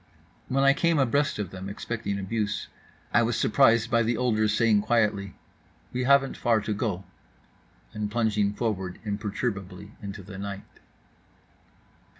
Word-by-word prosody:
When 135 +1 +1
I 140 0 +6
came 170 +2 +2
abreast 140 +2 +2
of 100 -4 -4
them, 95 +1 -7
expecting 105 0 -4
abuse, 105 +1 -2 0.4
I 120 - +5
was 115 0 +1
surprised 115 -1 +4
by 115 -1 +4
the 115 0 0
older's 110 -4 +2
saying 110 -1 +3
quietly 105 -3 +1 0.6
"We 125 0 -1
haven't 135 0 +4
far 115 -2 +2
to 105 - -2
go," 100 -3 -2 0.9
and 105 -1 -3
plunging 105 -2 +1
forward 95 -6 -2
imperturbably 100 -2 -4
into 100 -1 -7
the 95 0 -9
night. 100 0 -5
110 Hz, 140 wpm, -27 LUFS, 100-120 Hz, 0.9 s, I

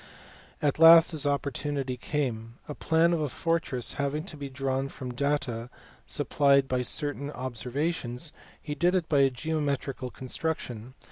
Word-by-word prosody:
At 145 0 +1
last 165 +1 +9
his 150 -3 0
opportunity 140 -1 -2
came. 120 -4 -3
A 150 - -5
plan 165 +3 +2
of 165 - 0
a 150 - -1
fortress 160 -4 0
having 140 +2 -1
to 175 -3 -7
be 140 -2 -6
drawn 135 0 -2
from 130 -2 -7
the 125 - -7
data 125 -4 -1 0.4
supplied 140 -1 +3
by 130 -1 0
certain 145 +3 -2
observations, 130 +2 -3 0.3
he 150 - -5
did 175 +5 +2
it 175 -3 0
by 145 -3 +3
a 135 -1 +5
geo 155 +5 -3
metrical 135 -3 -2
construction. 130 -3 -4
140 Hz, 155 wpm, -28 LUFS, 130-155 Hz, 0.4 s, last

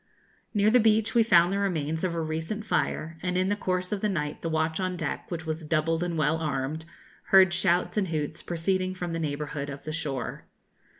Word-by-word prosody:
Near 205 +1 +4
the 250 - +6
beach 220 -1 +3
we 235 - +5
found 180 -4 +5
the 200 - 0
remains 160 -5 -1
of 175 -2 0
a 165 - -1
recent 160 +7 -3
fire, 160 -5 -1
and 180 0 -1
in 185 +1 +2
the 205 - +2
course 185 -2 -2
of 205 -2 -2
the 210 - +1
night 150 -6 -2
the 165 - -2
watch 160 +1 0
on 185 -1 -1
deck, 155 -4 -4
which 170 -2 -4
was 160 0 -3
doubled 165 +1 0
and 175 -2 -2
well 155 +1 +2
armed, 150 0 -2 0.4
heard 190 -2 +6
shouts 175 +2 +1
and 200 -3 +2
hoots 155 -1 -3
proceeding 185 +2 -1
from 175 -2 -4
the 165 - -2
neighbourhood 145 -2 -3
of 140 0 -7
the 155 - -5
shore. 140 -5 -4
170 Hz, 215 wpm, -27 LUFS, 155-185 Hz, 0.4 s, the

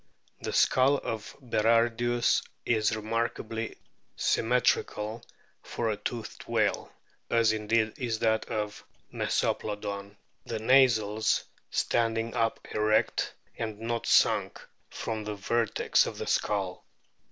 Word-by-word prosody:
The - - -3
skull 130 - +4
of 110 -4 -5
Berardius 120 0 +2 0.2
is 110 -1 +2
remarkably 115 0 -3 0.4
symmetrical 115 -2 +1 0.4
for 115 -2 -2
a - - -1
toothed 115 0 -6
whale, - - 0 0.4
as 115 -2 +4
indeed 110 0 +1
is 120 -4 -1
that 110 0 +1
of 105 -1 -4 0.3
Mesoplodon, 100 -1 -2 0.3
the 115 - -4
nasals 110 -3 +3 0.3
standing 115 -1 0
up 115 -1 -1
erect, 110 0 +1 0.3
and 110 -2 -4
not 115 +1 -3
sunk - - +3 0.3
from 110 -1 -4
the 105 0 -4
vertex 115 +2 +1
of - - -6
the - - -4
skull. 100 -4 -1
110 Hz, 105 wpm, -29 LUFS, 105-115 Hz, 0.4 s, skull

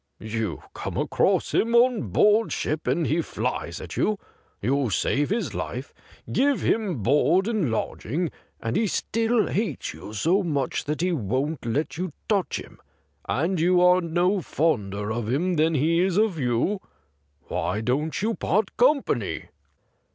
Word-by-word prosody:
' - - -51
You 110 -6 -3
come - - -5
across - - +1
him 230 +1 +2
on 240 -2 +4
board 210 +2 +4
ship 155 +1 -2
and 170 - +1
he 165 +4 +1
flies - - -3
at - - -8
you. 215 -1 +1 0.4
You 135 +3 +1
save 140 +8 +1
his 225 +4 -1
life, - - -5 0.4
give 280 0 +2
hira 210 -6 +1
board 150 - +3
and 215 - 0
lodging, 145 +8 -2 0.3
and 115 +1 -3
he 220 - +2
still 225 +3 +1
hates 215 +2 -2
you - - -10
so 170 - +2
much 145 -8 -1
that 150 +2 -2
he 180 +1 +1
won't 130 - -2
let 145 +7 -1
you 185 0 -1 0.2
touch 200 -4 +1
him, - - -12 0.5
and 165 +8 0
you 180 +2 +4
are 180 +1 +5
no 180 +3 +1
fonder 105 - -1
of 115 0 -2
him 175 +8 +1
than 160 0 +2
he 160 +4 +2
is 185 0 +2
of 210 -6 +2
you. 130 - 0 0.6
Why 105 - -2
don't 140 +7 -1
you 225 +2 +1
part 210 0 0
company 275 +3 +1
165 Hz, 160 wpm, -25 LUFS, 130-200 Hz, 0.6 s, are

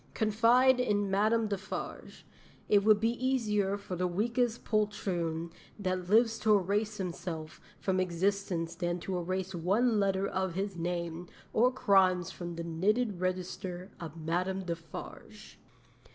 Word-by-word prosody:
Confide 240 +4 +4
in 205 -5 +1
Madame 215 +3 +2
Defarge. 195 -2 -6 0.4
It 205 -1 +4
would 215 0 +5
be 230 +3 -1
easier 210 -6 +1
for 200 -2 -6
the 180 +1 0
weakest 230 +6 0
poltroon 175 -6 -1 0.3
that 185 -3 -2
lives 225 +1 +4
to 215 -1 +5
erase 205 +3 -1
himself 170 -4 -5 0.2
from 190 -1 0
existence 180 -1 0
than 175 0 -2
to 190 - -3
erase 185 +2 -3
one 205 +7 +2
letter 195 -1 +1
of 190 -3 -2
his 195 0 -2
name 170 0 -3 0.3
or 245 +3 +4
crimes 190 -7 +3
from 175 -1 -6
the 170 - -4
knitted 195 +5 0
register 185 0 -3
of 165 -1 -7
Madame 180 +4 -1
Defarge."' 170 -2 -8
190 Hz, 135 wpm, -31 LUFS, 175-215 Hz, 0.4 s, would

